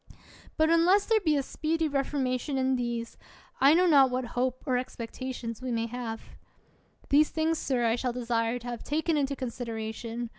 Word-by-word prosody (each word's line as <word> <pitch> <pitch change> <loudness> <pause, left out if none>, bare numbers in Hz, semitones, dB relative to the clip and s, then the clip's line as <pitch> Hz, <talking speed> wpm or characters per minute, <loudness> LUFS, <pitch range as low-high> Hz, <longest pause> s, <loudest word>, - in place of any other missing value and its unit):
But 315 +1 +3
unless 355 +5 +4
there 450 -1 +3
be 310 -7 +2
a 280 - 0
speedy 320 +3 -1
reformation 275 -1 -1
in 260 0 +2
these, 235 -2 -3 0.4
I 280 +3 +6
know 360 +2 +4
not 280 -6 +6
what 250 0 -2
hope 255 +1 -1
or 260 -4 +1
expectation 245 0 -4
we 255 -1 -3
may 230 -1 0
have. 230 -1 -5 0.9
These 295 +2 +5
things, 320 0 0
sir, 250 -3 0
I 225 0 +3
shall 250 0 -1
desire 235 -1 -1
to 245 0 -9
have 240 -1 -5
taken 315 +2 0
into 280 -1 0
consideration. 230 -2 -5
255 Hz, 175 wpm, -28 LUFS, 240-295 Hz, 0.9 s, I